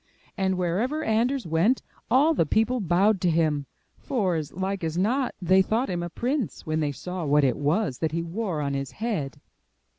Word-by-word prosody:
And 190 -1 0
wherever 215 - 0
Anders 245 +3 +1
went, 170 +10 +2 0.3
all 280 +7 +4
the 165 - +1
people 225 +8 +2
bowed 195 +3 +2
to 180 - +2
him, 155 -4 +1 0.3
for, 205 -9 0
as 155 -3 -3
like 190 +1 -3
as 160 +1 -2
not, 245 +8 +1
they 185 +1 +4
thought 225 +6 0
him 175 -1 -2
a 175 - -4
prince 250 - -2
when 155 0 -1
they 150 -2 0
saw 180 +5 -5
what 145 0 +3
it 130 - +3
was 145 - 0
that 160 -2 0
he 165 +1 -2
wore 175 -2 -3
on 140 -1 -1
his 135 -1 -4
head. 200 - -3
180 Hz, 190 wpm, -26 LUFS, 160-225 Hz, 0.3 s, all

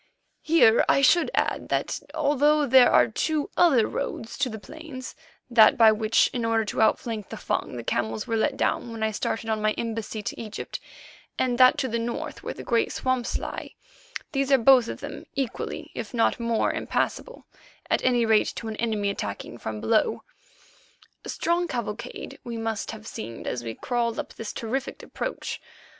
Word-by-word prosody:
Here 305 -8 +5
I 275 - +4
should 340 +6 +5
add - - 0
that, - - -1 0.2
although 295 0 +3
there 260 -1 +7
are - - +5
two 300 +6 -1
other 275 -11 +5
roads 225 - -4
to 275 -3 +1
the 220 - -6
plains—that 260 -1 0
by 225 -1 +8
which, 215 +1 +3
in 240 - -2
order 225 -1 +1
to 205 - -2
outflank 220 -1 +1
the - - -6
Fung, - - -2
the 120 - -5
camels 110 -1 -1
were 225 - -1
let 265 +5 +1
down 240 - 0
when 225 -1 -4
I 220 - +1
started 225 +1 -3
on 220 -1 -1
my 215 0 +2
embassy 225 -2 -4
to - - -5
Egypt, 215 -2 -6 0.6
and 250 -1 0
that 255 0 +7
to 265 - 0
the 235 -1 -1
north 235 +1 -4
where - - -5
the - - -8
great 235 - +1
swamps 255 -2 -1
lie—these 405 - -6
are 270 - +7
both 250 -1 +6
of - - -6
them - - -8
equally, 270 -4 -4
if - - -6
not 230 - +2
more, 230 -1 +1
impassable, - - -2 0.4
at - - +1
any 245 -2 +3
rate 220 -1 +3
to 230 - -6
an 220 - -4
enemy 215 -3 0
attacking 105 - -6
from 110 -1 -5
below. 220 - +1 1.0
A - - -8
strange 345 +1 0
cavalcade 235 -3 -5
we 235 -1 -5
must 225 -2 -3
have 220 -1 -8
seemed 115 - -7
as 120 -1 -3
we 115 -1 -5
crawled 235 -2 -1
up - - -5
this 225 -2 -6
terrific 250 +4 -4
approach. - - -5
230 Hz, 180 wpm, -26 LUFS, 220-265 Hz, 1.0 s, by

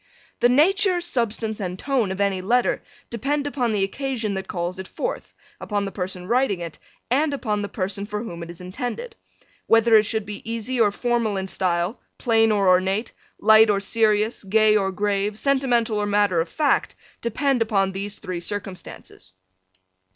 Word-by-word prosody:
The 240 - +4
nature, 365 +7 +3
substance 230 -9 -1
and 185 -2 -4
tone 250 -5 0
of 190 - -5
any 200 -2 +1
letter 240 +6 +1 0.3
depend 280 +5 -1
upon 260 -5 -1
the 205 -2 +1
occasion 235 0 -2
that 190 0 -4
calls 175 +1 -3
it 190 - -6
forth, - - -4 0.3
upon 205 -1 -2
the 195 - -4
person 180 -2 -5
writing 240 -5 +1
it 170 -2 -7 0.3
and 285 +3 +2
upon 210 -6 -2
the 205 - -4
person 200 +1 -3
for 210 +1 -4
whom 170 -7 -7
it 170 - -7
is 170 - -9
intended. 245 - -5 0.5
Whether 225 0 +5
it 210 -1 +3
should 220 -2 -1
be 210 -1 -7
easy 230 +2 -1
or 210 -2 +4
formal 235 -2 0
in 190 - -2
style, 180 +1 -1 0.2
plain 225 -2 +3
or 200 -2 +2
ornate, 190 +4 +2 0.3
light 220 0 +6
or 200 -1 +3
serious, 215 +1 +1
gay 215 +2 +4
or 195 -2 +1
grave, 205 +1 -1
sentimental 245 -5 +1
or 205 - -1
matter 205 -4 +2
of 165 - -4
fact 295 - +1 0.3
depend 250 +2 0
upon 195 -4 +1
these 200 +2 -5
three 180 -2 -5
circumstances. 190 - -7
210 Hz, 175 wpm, -23 LUFS, 195-240 Hz, 0.5 s, light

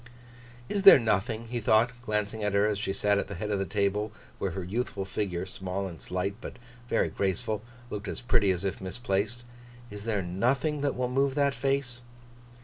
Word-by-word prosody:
'Is 200 - -1
there 195 - +11
nothing,' 115 0 0
he 120 0 -2
thought, 110 +2 +4
glancing 105 -1 -1
at 105 -1 0
her 100 +1 +4
as 105 -2 0
she 105 - -1
sat 100 +1 +2
at - - -2
the 100 - -6
head 105 +4 -3
of 100 - +1
the 95 - 0
table, 105 +1 0 0.3
where 100 - 0
her 95 - -2
youthful 100 0 -2
figure, 95 -3 -2
small 95 +1 -4
and 85 -3 -9
slight, 90 +2 -2
but - - -8 0.3
very - - +2
graceful, 100 +2 -1 0.3
looked 105 0 -4
as - - -3
pretty 120 -5 +3
as 95 0 0
it - - +3
looked 95 - -10
misplaced; 105 +3 -2 0.5
'is 105 0 -7
there 105 -4 0
nothing 130 - 0
that 140 -1 0
will 125 0 0
move 135 +2 +1
that 140 -1 +3
face? 135 -3 -1
105 Hz, 200 wpm, -29 LUFS, 95-120 Hz, 0.5 s, there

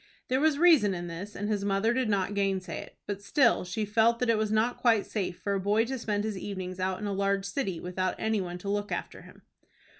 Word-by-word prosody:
There 260 +1 +2
was 305 -1 +3
reason 295 - +5
in 175 0 -5
this, 175 +5 -7
and 205 - -3
his 210 -2 -1
mother 200 +3 +1
did 255 -2 0
not 200 -1 0
gainsay 195 -3 -1
it, - - -11
but 200 -1 -4
still 235 +4 +3
she 180 +4 -3
felt 225 +3 +3
that 245 -1 +2
it 225 - +2
was 215 -1 0
not 220 +3 +1
quite 230 -4 +3
safe 195 -5 -3
for 200 - -2
a 195 - 0
boy 205 +4 +2
to 260 +1 -4
spend 210 -2 -1
his 215 -3 -3
evenings 185 -2 -5
out 185 0 -1
in 210 - -4
a 200 - -1
large 195 0 0
city, 200 -4 -2
without 185 +1 -2
any 220 -2 0
one 175 -1 -5
to 180 - -9
look 205 +1 -1
after - - -4
him. - - -16
205 Hz, 245 wpm, -29 LUFS, 190-225 Hz, -, reason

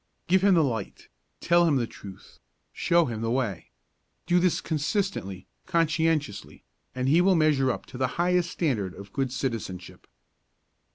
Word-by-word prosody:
Give 185 +2 +3
him 200 -2 +5
the 165 - +4
light, 115 -7 -4 0.3
tell 175 0 +4
him 150 - +3
the 125 -3 +1
truth, 100 -4 -13 0.3
show 170 -1 +2
him 115 -3 -4
the 115 - -1
way. 115 -9 -2 0.6
Do 175 0 +3
this 180 -1 +2
consistently, 150 - -2 0.2
conscientiously, 160 - 0 0.3
and 130 0 -1
he 160 +6 +5
will 190 +1 +4
measure 150 -5 +3
up 125 - -3
to 125 - -10
the 130 - +2
highest 175 0 +2
standard 110 - -2
of 100 0 -12
good 135 -2 -1
citizenship. 115 -9 -5
145 Hz, 155 wpm, -26 LUFS, 115-170 Hz, 0.6 s, him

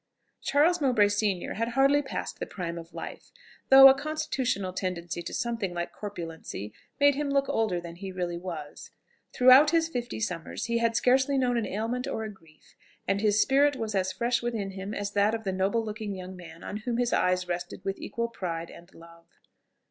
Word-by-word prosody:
Charles 325 +4 +3
Mowbray 240 -7 +4
senior 205 -3 -1
had 230 +2 -1
hardly 275 +2 +5
passed 265 - -5
the - - -4
prime 170 -3 -5
of 165 +1 -12
life, - - -8 0.4
though 270 0 +11
a 265 - +8
constitutional 270 -9 -2
tendency 175 -2 -3
to 170 - -6
something 230 -7 -2
like 175 0 -4
corpulency 165 - -7 0.3
made 285 0 +6
him 290 +1 -2
look 275 0 +1
older 215 -6 0
than 170 0 -9
he 190 +1 -6
really 175 -2 -3
was. 165 -5 -7 0.4
Throughout 255 +4 +7
his 330 0 +2
fifty 245 -5 -4
summers 180 0 -4
he 235 0 0
had 230 -1 +1
scarcely 265 +3 +3
known 250 -2 +1
an 230 -3 0
ailment 230 +5 -2
or 220 - -3
a 215 - -5
grief, 160 -5 -23 0.3
and 195 +1 +1
his 210 -1 +3
spirit 285 +3 +4
was 225 -4 -4
as 190 -1 0
fresh 235 +4 0
within 225 -5 -3
him 195 +2 -6
as 205 0 -3
that 205 +2 +2
of 225 - -6
the 190 -2 -2
noble 195 +5 0
looking 210 -2 -5
young 185 0 -8
man 170 -2 -12
on 205 - -5
whom 235 +2 -3
his 245 -1 0
eyes 180 0 +1
rested 175 +1 -5
with 195 0 -2
equal 235 0 -3
pride 170 -6 -5
and 175 +2 -15
love. 170 0 -16
210 Hz, 195 wpm, -28 LUFS, 180-250 Hz, 0.4 s, though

